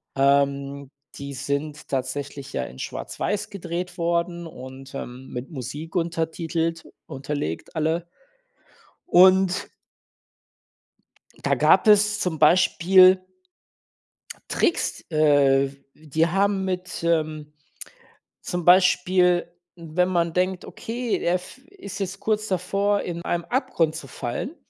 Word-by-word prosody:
Ähm, 140 0 +1 0.3
die 140 0 -7
sind 140 +3 -4
tatsächlich 135 +1 -4
ja - - -1
in 65 - -10
schwarz-weiß 205 0 -4
gedreht 180 -2 -5
worden 170 0 -1
und, 130 -2 -11
ähm, 125 +1 -7
mit 125 +4 -6
Musik 145 +5 -7
untertitelt 165 0 -2 0.2
unterlegt 135 - -5
alle. 160 +2 0 1.0
Und 185 +1 +5 1.8
da - - +3
gab - - +4
es 210 0 +5
zum 175 -5 -2
Beispiel 185 +3 +6 1.3
Tricks 340 - 0
äh, 145 -3 +4 0.3
die 155 +1 0
haben 195 +2 +1
mit, 180 -2 -4
ähm 155 -2 -1 0.9
zum 175 -2 -3
Beispiel, 180 -1 +4 0.3
wenn 170 +2 -1
man 170 -2 0
denkt, 185 0 0
okay, 235 0 -3
der 175 - +1
f 180 +8 -7
ist 375 - -9
jetzt 195 0 -4
kurz 215 -1 -1
davor 200 +3 0
in 170 -1 -5
einem 170 -1 -2
Abgrund 175 - 0
zu 145 - -7
fallen, 120 - -4
äh, 335 - -19
170 Hz, 110 wpm, -24 LUFS, 145-185 Hz, 1.8 s, Beispiel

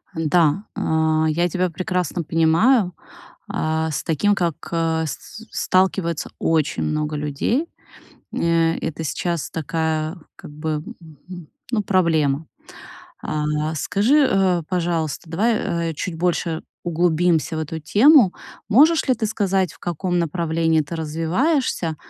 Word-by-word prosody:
Н-да, 165 +3 +2
а, 160 0 +1
я 175 +3 +1
тебя 185 +2 0
прекрасно 180 0 -2
понимаю. 170 - +3 0.5
А, 160 0 -1
с 140 - -3
таким 200 +5 +1
как, 170 -5 0 0.2
а, 165 -1 0
с 210 +9 -8
сталкивается 185 -3 0
очень 160 -3 +1
много 155 0 -1
людей. 150 - -1 0.7
Э 165 -1 +2
это 160 +1 -4
сейчас 170 +2 -2
такая 160 +1 -2 0.2
как - - -11
бы, 150 0 -3 0.9
ну, 215 -3 +1
проблема. 160 -6 +1 0.8
А, 150 +1 -2
скажи, 245 - +3
а, 185 -3 +2
пожалуйста, 170 -4 -2
давай, 170 -4 0
а, - - -7
чуть 165 +3 -4
больше 170 -1 -1 0.2
углубимся 170 -1 +1
в - - -2
эту 160 +1 -4
тему, 215 - +5 0.4
можешь 300 +8 +5
ли 255 - +4
ты 225 - -2
сказать, 195 -4 0
в - - -20
каком 175 +1 -2
направлении 165 -1 +1
ты 150 +3 -6
развиваешься, 165 - 0
165 Hz, 120 wpm, -21 LUFS, 160-185 Hz, 0.9 s, тему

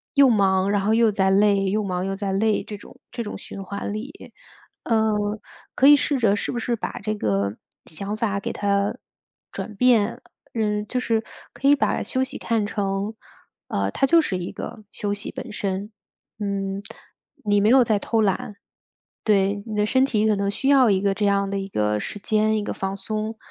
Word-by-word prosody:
又 280 -1 +7
忙， 195 -3 +3
然 205 -1 +2
后 215 +3 +2
又 225 -2 +4
在 190 -2 +2
累 200 0 +4
又 210 +3 0
忙 185 -1 -2
又 195 - -2
在 195 0 -3
累 215 +2 +1
这 210 - -7
种 255 - -15
这 235 - -4
种 210 - -6
循 195 - -8
环 200 +2 -5
里。 250 +8 -8 0.5
呃， 220 -2 +2 0.6
可 265 - +3
以 290 - +10
试 285 0 0
着 210 -4 +3
是 - - -3
不 - - -4
是 240 +1 -1
把 225 - -5
这 215 +1 -1
个 100 - 0 0.3
想 200 +6 -5
法 205 -3 0
给 - - -4
它 200 0 0 0.6
转 215 - -6
变， 235 -2 +3 0.3
嗯， 210 -1 0
就 250 - -1
是， 225 -2 0 0.3
可 275 - -1
以 285 - +7
把 280 - 0
休 260 0 0
息 260 +1 -5
看 225 -3 0
成， 200 0 -2 0.5
呃， 100 0 -1
它 270 - +1
就 335 +4 +6
是 190 -10 -2
一 175 - -5
个 215 - -8
休 205 -1 -3
息 205 - -4
本 - - -7
身。 200 +1 -3 0.5
嗯， 195 -1 -2 0.6
你 205 -1 +3
没 210 - +4
有 260 +1 +7
在 215 -3 +1
偷 225 +1 0
懒， 200 +1 -1 0.7
对， 200 -1 +2
你 220 - -5
的 210 - +2
身 260 +5 +3
体 215 -5 +1
可 215 -2 +3
能 200 0 0
需 265 +7 -2
要 270 -4 +6
一 190 -1 +2
个 200 -1 +2
这 210 0 0
样 200 -1 +1
的 200 - -1
一 195 0 -4
个 105 - 0
时 205 - -5
间、 215 +1 +1
一 210 - -1
个 - - -3
放 195 0 -3
松。 215 +2 -3
205 Hz, 215 characters per minute, -23 LUFS, 195-225 Hz, 0.7 s, 以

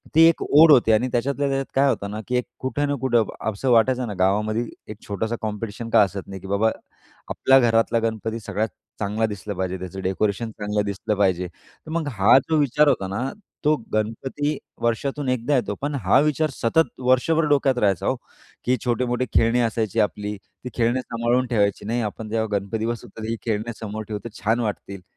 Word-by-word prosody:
ती 160 - +7
एक 165 - -1
ओढ 155 +2 +7
होती 120 -5 +6
आणि 110 +4 +3
त्याच्यातल्या 140 +4 0
त्याच्यात 135 0 -1
काय 140 +1 +4
होतं 100 -5 -2
ना 105 - -4
की 125 - -1
एक 125 - -1
कुठं 145 +2 -1
ना 145 - +1
कुठं 120 -4 +3 0.3
असं 125 +5 -1
वाटायचं 125 +2 +3
ना 105 - -4
गावामध्ये 105 +5 +1 0.3
एक 105 - -8
छोटासा 110 +3 -2
कॉम्पिटिशन 110 +1 -4
का - - +6
असत 100 -1 -4
नाही 95 -1 -8
की 95 - -9
बाबा 100 +3 +2 0.6
आपल्या 135 0 +4
घरातला 115 -1 +3
गणपती 110 0 -2
सगळ्यात 105 0 -2 0.3
चांगला 105 +2 0
दिसला 105 -1 -5
पाहिजे, 95 0 -2
त्याचं 95 +1 -6
डेकोरेशन 100 +4 -1
चांगलं 105 -1 -2
दिसलं 100 +1 -2
पाहिजे. 90 -3 +1
तर 90 - -19
मग 165 -2 -1
हा 105 +4 +5
जो 160 - +3
विचार 145 +1 +3
होता 95 -8 +2
ना, 100 +4 -3 0.4
तो 150 +1 +5 0.2
गणपती 135 +7 -1 0.2
वर्षातून 135 +4 -1
एकदा 130 +3 +1
येतो. 110 -5 0
पण 145 +1 -2
हा 95 +8 +5
विचार 150 +1 +1
सतत 130 +5 +1
वर्षभर 155 +6 +3
डोक्यात 135 -3 +3
राहायचा, 100 -5 +1
हो. - - +2 0.5
की 125 +1 +2
छोटे-मोठे 125 +1 0
खेळणी 115 +2 +3
असायची 115 -1 0
आपली, 105 0 -2
ती 125 +5 -12
खेळणी 120 +2 +1
सांभाळून 120 +1 0
ठेवायची, 100 -5 0
"नाही 120 +3 -1
आपण 110 +1 -9
जेव्हा 110 0 0
गणपती 105 +3 -3
बसवू 115 -1 -4
तर 110 - -5
ही 115 - -1
खेळणे 110 +1 -1
समोर 110 0 -5
ठेवली 105 0 -5
तर 110 - -14
छान 115 +3 +2
वाटतील." 100 -3 -4
115 Hz, 195 wpm, -23 LUFS, 105-130 Hz, 0.6 s, ती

